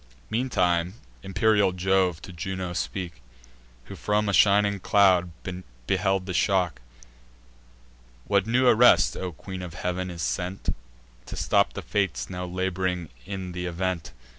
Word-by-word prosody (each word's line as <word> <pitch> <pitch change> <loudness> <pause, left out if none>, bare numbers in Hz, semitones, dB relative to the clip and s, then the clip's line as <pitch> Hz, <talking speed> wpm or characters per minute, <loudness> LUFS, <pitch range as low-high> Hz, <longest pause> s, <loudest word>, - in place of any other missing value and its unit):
Meantime 90 -7 +1 0.3
imperial 100 0 +2
Jove 90 -2 +1
to 95 - -9
Juno 90 +1 -4
spoke, 90 -1 -4 0.6
Who 100 - -10
from 105 +2 0
a 100 - 0
shining 100 0 +4
cloud 95 -2 +4 0.6
beheld 95 +5 +1
the 95 - -4
shock: 90 -2 +1 1.4
"What 100 0 +2
new 125 +3 +3
arrest, 125 0 +6
O 90 -1 -4
Queen 95 +4 -8
of 90 -1 -7
Heav'n, 90 +1 -3
is 85 -2 -5
sent 90 +2 -2 0.5
To - - -6
stop - - +2
the - - -6
Fates 100 -3 -1
now 90 0 -4
lab'ring 90 -1 -2 0.2
in 95 -2 -5
th' - - -8
event? 90 -2 -3
95 Hz, 135 wpm, -26 LUFS, 90-100 Hz, 1.4 s, arrest